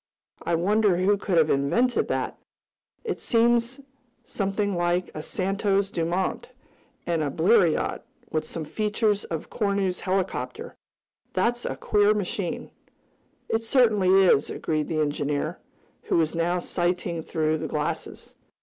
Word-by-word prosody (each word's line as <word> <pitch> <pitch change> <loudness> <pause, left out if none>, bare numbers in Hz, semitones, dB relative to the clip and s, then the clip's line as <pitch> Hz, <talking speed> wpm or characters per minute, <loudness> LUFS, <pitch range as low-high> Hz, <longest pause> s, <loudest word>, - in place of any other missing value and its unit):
I 170 - 0
wonder 200 +2 +2
who 190 +3 +3
could 190 -3 -1
have 160 -1 +4
invented 230 - +2
that? - - -2 0.6
It's 440 -3 -3
something 235 -4 -1
like 175 +1 0
a 155 - -5
Santos 195 +2 0
Dumont 175 - -1 0.6
and 170 -2 0
a 150 - 0
Bleriot, 175 +2 +2 0.3
with 155 -1 0
some 155 0 -6
features 210 +2 0
of 165 -2 -5
Cornu's 200 -4 0
Helicopter. 190 0 -3 0.6
That's 240 0 0
a - - -2
queer 210 0 +3
machine." 195 -2 -3 0.8
"It 225 - 0
certainly 220 -6 +3
is," 150 -6 +4
agreed 155 -1 -2
the 155 - -1
engineer, 145 +2 -1 0.5
who - - +1
was 160 -2 +1
now 170 +1 0
sighting 175 -1 -1
through 155 -1 -1
the - - -3
glasses. - - -4
185 Hz, 125 wpm, -25 LUFS, 165-215 Hz, 0.8 s, have